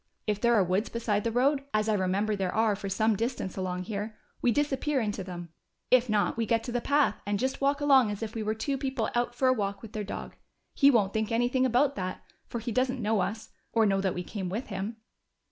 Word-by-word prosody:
If 210 -1 -1
there 235 0 +4
are 205 - +5
woods 185 +4 0
beside 215 -3 -1
the 230 - 0
road, 270 +4 +2
as 215 0 +2
I 220 - +2
remember 200 +2 +1
there 190 -2 -1
are 220 -1 +3
for 195 0 -5
some 215 +3 +2
distance 230 -3 -3
along 185 -1 -3
here, 210 +2 -5 0.2
we 245 - +3
disappear 290 +1 0
into 210 -4 -2
them. 175 -2 -7 0.4
If 255 -1 +5
not, 210 0 +1
we 230 -1 0
get 230 0 +2
to 245 - -5
the 245 0 -1
path, 285 -6 +2
and 205 +1 -1
just 260 +5 -2
walk 280 +1 +2
along 270 -5 +5
as 205 +1 -4
if 220 -1 -5
we 225 - -3
were 215 +1 -1
two 270 +4 -2
people 265 -5 -2
out 240 0 0
for 260 - +2
a 255 - +5
walk 200 -3 -3
with 220 0 -10
their 215 -2 -3
dog. 200 - -6 0.4
He 280 - +6
won't 210 -7 +3
think 220 +1 -1
anything 245 +3 +2
about 260 +3 +2
that, 185 -1 -4 0.2
for - - -4
he 235 +1 -4
doesn't 255 +2 0
know 215 -1 +1
us, 220 +4 -3 0.2
or 225 -1 +4
know 195 -1 +2
that 190 -2 0
we 180 - -3
came 190 -1 -5
with 220 +7 -4
him." 200 +3 -4
220 Hz, 245 wpm, -29 LUFS, 200-250 Hz, 0.4 s, He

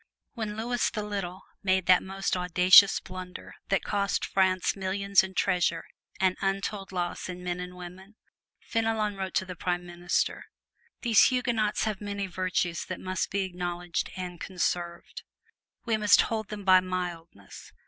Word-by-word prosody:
When 215 -3 -4
Louis 240 +1 0
the 215 -2 -4
Little 195 -3 -5 0.2
made 190 -1 +1
that 185 -1 +6
most 195 0 -2
audacious 180 +2 +6
blunder 185 0 -9 0.2
which 195 - +1
cost 200 -1 0
France 185 -1 +1
millions 195 +1 +2
in 190 0 -7
treasure 170 -2 +1 0.4
and 185 -1 +2
untold 195 0 -2
loss 180 0 -3
in 180 0 -7
men 180 0 -3
and 180 0 -7
women, 180 +3 -11 0.5
Fenelon 225 -2 -1
wrote 190 -1 -5
to 190 - +1
the 180 -1 -7
Prime 175 0 -2
Minister: 175 0 -1 0.6
"These 230 -4 +6
Huguenots 235 -5 +1
have 215 -2 -2
many 200 -1 -3
virtues 180 -2 -1
that 185 - -5
must 185 0 -2
be 200 - -1
acknowledged 175 -2 -3
and 180 -2 -6
conserved. 175 -2 -3 0.6
We 225 -2 +1
must 210 -1 +6
hold 220 -2 -2
them 210 -1 -6
by 185 -1 +7
mildness. 175 - -6
185 Hz, 150 wpm, -28 LUFS, 180-200 Hz, 0.6 s, by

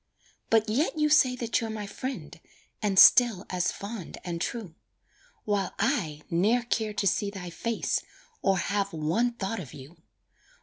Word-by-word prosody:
But 225 -1 +3
yet 275 +9 0
you 300 0 +2
say 265 -4 +5
that 235 -2 -1
you're 225 - -3
my 215 -1 -5
friend, 260 +6 -6 0.4
And 200 -3 0
still 230 -3 +7
as 180 -1 0
fond 200 -2 -7
and 170 -2 -4
true; 210 -5 -4 0.7
While 205 -3 -1
I 195 - -1
ne'er 210 +9 +2
care 220 -3 -1
to 200 - -2
see 200 +2 +1
thy 185 -3 -7
face, 230 +6 -1 0.4
Or 195 -1 +2
have 200 0 -1
one 165 +11 0
thought 225 0 -3
of 150 -9 -9
you. 140 +6 -12
205 Hz, 160 wpm, -28 LUFS, 180-235 Hz, 0.7 s, still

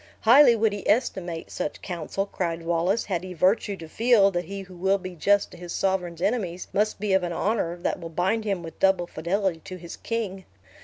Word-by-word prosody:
"Highly 245 +2 +7
would 220 -1 +2
he 205 - -4
estimate 180 -7 0
such - - -4
counsel," 180 +2 -3
cried 170 -4 -3
Wallace, 170 +6 +1
"had 180 -4 -2
he 185 -1 -7
virtue 195 +4 +2
to 165 - -9
feel 220 +1 +4
that 175 -1 -2
he 195 +3 -6
who 185 -1 -12
will 190 +3 +2
be 185 -1 -8
just 200 +4 +2
to - - -12
his 175 -1 -7
sovereign's 180 -3 -1
enemies 190 -5 -1
must 210 +1 +1
be 205 -1 0
of 190 - +4
an 175 -1 -3
honor 185 -2 0
that 175 - -2
will 165 -1 -7
bind 190 +7 0
him 195 -5 -2
with 165 - -9
double 190 -2 +3
fidelity 175 +2 -1
to 185 +3 -9
his 170 -1 -9
king. 205 -5 -4
190 Hz, 210 wpm, -25 LUFS, 175-205 Hz, -, Highly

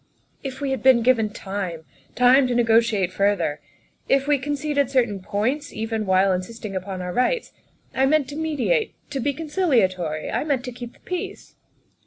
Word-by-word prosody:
"If 270 0 -6
we 275 -1 -1
had 265 -4 -2
been 255 -3 +5
given 230 -3 +3
time 190 -6 -5 0.3
time 255 +2 +5
to 245 - -1
negotiate 225 -5 +3
further. 190 -7 0 0.5
If 275 0 +3
we 290 -2 +3
conceded 285 0 -1
certain 240 -7 +1
points, 240 +10 -2
even 220 -1 -3
while 190 +1 +4
in 180 - 0
sisting 215 0 -8
upon 185 0 -4
our 180 0 -4
rights. 345 - 0 0.4
I 265 +1 +2
meant 300 -1 +2
to 290 - -7
mediate 320 - 0 0.2
to 275 - -2
be 285 +3 0
conciliatory. 230 - 0
I - - 0
meant 280 -4 -1
to 250 - -5
keep 240 0 -9
the - - -24
peace." 365 -1 -6
245 Hz, 175 wpm, -23 LUFS, 200-280 Hz, 0.5 s, been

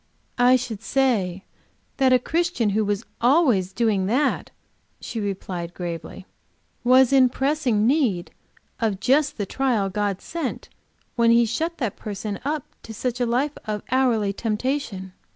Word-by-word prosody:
"I 250 +1 +6
should 230 -4 -3
say 210 -10 0 0.5
that 265 -1 +3
a 255 - +7
Christian 325 - 0
who 215 +2 +1
was 205 +2 -2 0.2
always 240 - +3
doing 210 -5 +1
that," 255 +8 0 0.5
she 230 - -5
replied, 185 -4 -4
gravely, 175 +1 -6 0.6
"was 255 +1 +5
in 260 -2 +6
pressing 265 -5 +1
need 240 - +1 0.5
of 215 -5 0
just 280 +6 +2
the 205 - -2
trial 225 -4 0
God 205 -1 -1
sent 325 -6 -5 0.5
when 235 -1 +3
He 235 0 +5
shut 325 +10 -2
him 210 -3 -4
up 295 0 -2 0.2
to 225 - -9
such 250 +2 -3
a 245 - +2
life 265 +5 0
of 210 -1 -3
hourly 235 -6 +2
temptation. 215 -3 -3
235 Hz, 140 wpm, -23 LUFS, 200-265 Hz, 0.6 s, a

